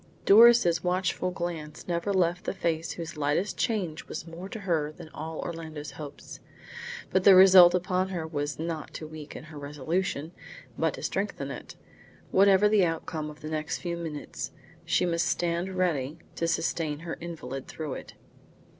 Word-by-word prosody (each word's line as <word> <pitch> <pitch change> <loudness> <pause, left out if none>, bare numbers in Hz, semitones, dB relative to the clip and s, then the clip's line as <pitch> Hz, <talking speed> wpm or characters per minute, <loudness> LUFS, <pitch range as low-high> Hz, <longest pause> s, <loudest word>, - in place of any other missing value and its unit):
Doris' 210 -6 +7
watchful 185 0 0
glance 170 -4 -5
never 175 +3 -1
left 180 -2 +1
the - - -2
face 165 -3 -1
whose 165 -2 -7
lightest 150 +7 0
change 190 -10 -1
was 155 - -6
more 170 +3 -8
to 220 - -7
her 160 -6 0
than 155 - -12
all 160 +1 -6
Orlando's 160 -3 -6
hopes. 145 0 -9 0.7
But 190 - +2
the 195 -1 +9
result 185 -2 +9
upon 185 +1 0
her 175 -4 -3
was 145 -2 -3
not 160 -1 -4
to 155 - -5
weaken 155 -1 -9
her 155 -1 -10
resolution, 150 +3 -2 0.4
but - - 0
to - - -9
strengthen - - -2
it. - - -8 0.6
Whatever 195 +1 +6
the 210 -2 +4
outcome 165 -2 -2
of 150 0 -12
the 155 - -6
next 155 0 -2
few 170 -1 -3
minutes, 160 -3 -5 0.3
she - - +2
must 170 -1 +1
stand 175 +2 -1
ready 155 -5 0 0.2
to 165 - -1
sustain 160 -2 -1
her 165 0 -5
invalid 135 -6 -6
through 155 -4 -5
it. - - -8
165 Hz, 165 wpm, -28 LUFS, 155-185 Hz, 0.7 s, the